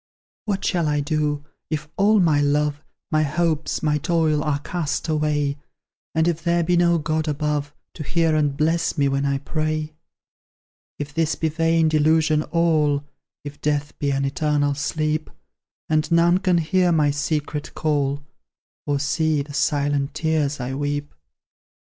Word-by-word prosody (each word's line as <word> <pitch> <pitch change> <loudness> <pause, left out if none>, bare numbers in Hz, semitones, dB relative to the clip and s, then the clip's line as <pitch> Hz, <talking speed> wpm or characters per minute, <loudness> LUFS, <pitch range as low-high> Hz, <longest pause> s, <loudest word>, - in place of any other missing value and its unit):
What 200 -3 -2
shall 170 -4 +1
I 150 0 +1
do, 145 0 -1 0.2
if 150 -1 -3
all 210 +2 +4
my 155 -5 +3
love, 145 0 +1 0.3
My 155 -1 +3
hopes, 155 +2 -1
my 150 -1 +2
toil, 155 -1 +1
are 150 -2 0
cast 155 +1 -3
away, 150 -2 0 0.6
And 160 +1 +3
if 170 -1 -1
there 170 0 +2
be 175 +2 +2
no 170 0 +4
God 155 0 -1
above, 150 -1 -1 0.2
To - - -9
hear 165 +1 +1
and 145 -2 +1
bless 165 +2 +1
me 140 -1 +3
when 140 +1 0
I 140 0 +1
pray? 155 +2 -2 1.0
If 145 0 -6
this 160 0 0
be 160 - -1
vain 165 +1 +2
delusion 155 0 +3
all, 155 -3 +2 0.4
If 145 0 -9
death 145 -1 -1
be 145 - 0
an 135 0 0
eternal 145 0 +1
sleep, 155 +2 -2 0.6
And 155 0 0
none 170 +2 +4
can 180 -2 +2
hear 175 +2 +2
my 150 -3 +3
secret 150 0 -3
call, 145 -2 0 0.6
Or 145 -1 +1
see 155 0 +1
the 145 0 -11
silent 145 -1 0
tears 155 -3 0
I 125 +2 -3
weep! 145 +1 -3
150 Hz, 155 wpm, -22 LUFS, 145-160 Hz, 1.0 s, all